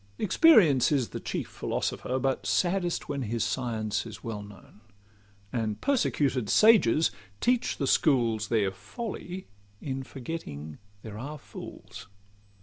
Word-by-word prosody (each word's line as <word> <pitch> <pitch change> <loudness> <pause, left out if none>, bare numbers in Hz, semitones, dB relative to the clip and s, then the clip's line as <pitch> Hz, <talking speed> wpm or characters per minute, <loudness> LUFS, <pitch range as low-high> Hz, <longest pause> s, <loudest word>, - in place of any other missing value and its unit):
Experience 190 - +5
is 135 -5 +1
the - - -5
chief - - -4
philosopher, 130 - -2
But 135 0 -1
saddest 175 -1 0
when 140 -2 -3
his 115 -1 -1
science 110 -4 -1
is 110 0 -10
well 110 -3 -4
known: 105 0 -14 0.7
And 110 -3 -1
persecuted 140 - +1
sages 205 - +5 0.3
teach 245 -1 +1
the 140 - -1
schools 115 -7 +2
Their 105 -4 +1
folly 180 - -7 0.3
in 135 -1 -4
forgetting 120 - -7 0.2
there 110 -1 -8
are 145 +5 -6
fools. 100 -6 -10
130 Hz, 125 wpm, -28 LUFS, 110-165 Hz, 0.7 s, Experience